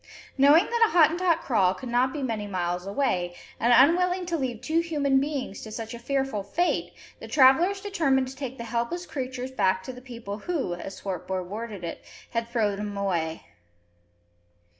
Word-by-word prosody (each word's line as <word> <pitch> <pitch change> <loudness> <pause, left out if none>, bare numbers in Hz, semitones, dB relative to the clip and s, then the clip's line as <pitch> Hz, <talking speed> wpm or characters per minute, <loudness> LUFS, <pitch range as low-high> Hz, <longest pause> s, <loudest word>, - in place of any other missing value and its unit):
Knowing 290 +6 +6
that 470 -1 +3
a - - -6
Hottentot 335 +1 +4
kraal 190 -7 +2
could 250 - -8
not 245 +2 +2
be 290 -1 -4
many 220 -5 -2
miles 180 -1 -2
away, 185 -6 -1 0.2
and 235 - +3
unwilling 355 +8 +4
to 345 -1 -1
leave 255 -7 -2
two 315 +7 0
human 290 -5 +1
beings 275 -7 -3
to 220 - -8
such 225 +1 -6
a 235 - -7
fearful 270 -3 -1
fate, 335 - -1 0.3
the - - -9
travellers 320 +8 +5
determined 300 -11 +1
to 260 - -8
take 265 -2 -6
the 235 - -6
helpless 235 +10 -2
creatures 255 -4 -5
back 190 -6 +1
to 255 - -7
the 250 - -11
people 230 -5 -7
who, 305 - -2
as 190 +2 -7
Swartboy 185 -1 -4
worded 205 0 -6
it, 170 - -6 0.3
had 230 0 -2
"throwed 210 -4 0
'um 205 -1 -4
away." 170 -5 -2
250 Hz, 180 wpm, -26 LUFS, 205-290 Hz, 0.3 s, Knowing